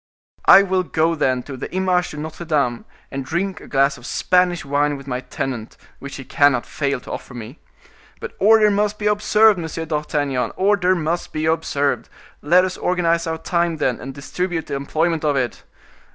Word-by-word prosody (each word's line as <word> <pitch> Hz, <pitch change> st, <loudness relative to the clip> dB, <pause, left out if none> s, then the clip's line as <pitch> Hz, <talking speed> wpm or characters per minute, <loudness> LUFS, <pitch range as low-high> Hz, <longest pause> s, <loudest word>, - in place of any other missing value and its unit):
I 195 Hz, -, +9 dB
will 190 Hz, -1 st, +1 dB
go 165 Hz, -1 st, +1 dB
then 130 Hz, -5 st, 0 dB
to 135 Hz, -, -8 dB
the 130 Hz, -, -7 dB
Image 185 Hz, -1 st, +1 dB
de 150 Hz, -, -9 dB
Notre 155 Hz, +3 st, -6 dB
Dame, 140 Hz, -7 st, 0 dB, 0.3 s
and 135 Hz, 0 st, -4 dB
drink 170 Hz, +6 st, -3 dB
a -, -, -12 dB
glass 140 Hz, 0 st, +1 dB
of 120 Hz, -, -10 dB
Spanish 180 Hz, -2 st, +1 dB
wine 145 Hz, +1 st, +1 dB
with 135 Hz, -, -12 dB
my 125 Hz, -2 st, -3 dB
tenant, 125 Hz, -2 st, -5 dB, 0.2 s
which 140 Hz, 0 st, -8 dB
he 135 Hz, -, -7 dB
cannot 135 Hz, -1 st, +2 dB
fail 140 Hz, -3 st, -2 dB
to -, -, -10 dB
offer 125 Hz, -, -7 dB
me. 120 Hz, +5 st, -9 dB, 0.6 s
But 470 Hz, -, -7 dB
order 215 Hz, +1 st, +5 dB
must 205 Hz, +1 st, 0 dB
be 210 Hz, -, -5 dB
observed, 210 Hz, 0 st, +4 dB
Monsieur 160 Hz, 0 st, -4 dB
d'Artagnan, 150 Hz, -4 st, -1 dB
order 190 Hz, -1 st, +2 dB
must 170 Hz, +1 st, -2 dB
be 155 Hz, 0 st, -2 dB
observed! 145 Hz, -6 st, 0 dB, 0.3 s
Let 180 Hz, +5 st, +4 dB
us 185 Hz, -, -4 dB
organize 170 Hz, -2 st, 0 dB
our 160 Hz, 0 st, -2 dB
time, 170 Hz, 0 st, -1 dB
then, 130 Hz, -5 st, -1 dB
and 135 Hz, -, -6 dB
distribute 165 Hz, +5 st, -3 dB
the -, -, -6 dB
employment 160 Hz, +4 st, -1 dB
of 150 Hz, -2 st, +1 dB
it! 125 Hz, -3 st, -2 dB
160 Hz, 185 wpm, -21 LUFS, 140-180 Hz, 0.6 s, I